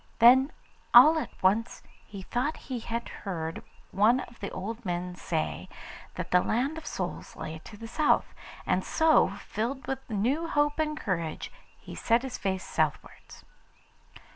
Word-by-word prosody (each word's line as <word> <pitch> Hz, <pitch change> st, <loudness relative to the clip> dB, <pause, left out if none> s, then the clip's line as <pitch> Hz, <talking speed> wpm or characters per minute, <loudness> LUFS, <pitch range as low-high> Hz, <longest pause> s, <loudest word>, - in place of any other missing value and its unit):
Then 260 Hz, +4 st, +7 dB, 0.4 s
all 305 Hz, +7 st, +9 dB
at 270 Hz, -, -4 dB
once 210 Hz, +5 st, +1 dB, 0.2 s
he 200 Hz, -2 st, -8 dB
thought 260 Hz, +10 st, -1 dB
he 250 Hz, -, -1 dB
had 235 Hz, +1 st, -4 dB
heard 165 Hz, -5 st, -5 dB, 0.3 s
one 220 Hz, +6 st, +4 dB
of 235 Hz, -, -11 dB
the 200 Hz, -, -4 dB
old 225 Hz, +5 st, -6 dB
men 180 Hz, -1 st, -3 dB
say 155 Hz, -, -3 dB, 0.5 s
that -, -, -5 dB
the 180 Hz, -, +5 dB
Land 260 Hz, -, 0 dB
of 315 Hz, -, -13 dB
Souls 180 Hz, -2 st, -5 dB
lay 160 Hz, 0 st, -6 dB
to 210 Hz, -, -11 dB
the 225 Hz, +2 st, -8 dB
south, 300 Hz, +6 st, +2 dB, 0.3 s
and -, -, +1 dB
so, 320 Hz, -, +4 dB
filled 240 Hz, +7 st, -4 dB
with 265 Hz, 0 st, -2 dB
new 250 Hz, +10 st, 0 dB
hope 295 Hz, -1 st, +1 dB
and 305 Hz, -1 st, -1 dB
courage, 170 Hz, -6 st, -3 dB, 0.3 s
he -, -, -11 dB
set 235 Hz, +2 st, +2 dB
his 265 Hz, -2 st, -5 dB
face 190 Hz, -1 st, -1 dB
southwards. -, -, -3 dB
230 Hz, 155 wpm, -28 LUFS, 185-265 Hz, 0.5 s, all